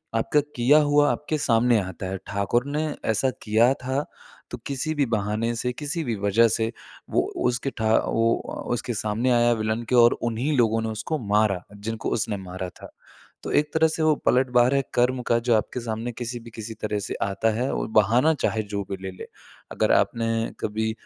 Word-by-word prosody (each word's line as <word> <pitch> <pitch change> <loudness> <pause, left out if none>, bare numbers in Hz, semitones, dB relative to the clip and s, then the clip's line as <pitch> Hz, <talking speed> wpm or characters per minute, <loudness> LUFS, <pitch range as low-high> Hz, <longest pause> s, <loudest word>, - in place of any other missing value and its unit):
आपका 115 +6 +2 0.2
किया 125 +5 +5
हुआ 145 0 +3
आपके 155 +1 -2
सामने 120 -3 +3
आता 95 0 -6
है। 95 +1 -3
ठाकुर 100 +5 0
ने 150 +2 -1 0.2
ऐसा 120 +4 +2
किया 115 +4 +3
था, 130 +2 -3 0.5
तो - - -4
किसी 140 +3 -2
भी 145 -2 +2
बहाने 110 +1 -1
से, 125 +2 -2
किसी 150 +4 -3
भी 120 -5 -2
वज़ह 100 +3 +4
से 110 0 -1 0.4
वो - - +2 0.2
उसके 125 +2 0
ठा 110 0 +2
वो 115 0 +2 0.3
उ - - -6
उसके 120 +1 -3
सामने 110 +4 -1
आया 120 0 +4
विलन 110 +1 -2
के 125 - +2
और 120 -1 +7 0.2
उन्हीं 120 +7 -2
लोगों 115 -2 +3
ने 110 - -2
उसको 110 +9 -3
मारा, 105 -4 +1
जिनको 110 +2 -4
उसने 105 -2 -1
मारा 95 -1 -6
था। - - -13 0.5
तो - - -4
एक 150 0 +1
तरह 160 0 +4
से 160 0 -2
वो 155 -1 +4
पलटवार 125 0 +3
है 135 - +3
कर्म 125 +1 +2
का, 115 - +3
जो 120 -1 +2
आपके 110 +3 -1
सामने 115 +1 -4
किसी 120 +1 -5
भी 115 0 -12
किसी 110 0 -6
तरह 105 -1 -1
से - - -4
आता 100 +3 0
है, 125 +4 -1
और - - -2
बहाना 120 +10 +4
चाहे 110 -7 -1
जो 100 -1 -4
भी 95 - -3
ले-ले। 95 -1 -7 0.4
अगर - - +1
आपने 115 -1 +2 0.3
कभी 110 +1 -1
115 Hz, 195 wpm, -24 LUFS, 110-130 Hz, 0.5 s, और